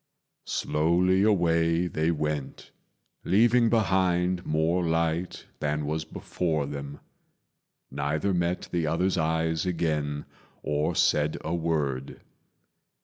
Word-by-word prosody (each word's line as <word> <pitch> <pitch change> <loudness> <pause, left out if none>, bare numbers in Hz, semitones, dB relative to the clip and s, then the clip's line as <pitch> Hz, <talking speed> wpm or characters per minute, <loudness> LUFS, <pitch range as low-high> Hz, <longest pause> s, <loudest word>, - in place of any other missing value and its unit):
Slowly 90 +5 +2
away 85 -4 +2
they 80 -2 -1
went, 75 -3 -3 0.5
leaving 115 +3 +4
behind 95 -5 +1
More 80 +3 +1
light 85 +1 -1
than 75 0 -1
was 80 +1 -2
before 80 -1 -2
them. 70 0 -7 0.9
Neither 75 +7 -1
met 85 0 -1
The 85 -3 0
other's 90 +4 +1
eyes 80 +1 0
again 75 -4 -1 0.4
or 75 0 0
said 75 0 +2
a 80 - -3
word. 75 -6 -2
80 Hz, 100 wpm, -27 LUFS, 75-90 Hz, 0.9 s, leaving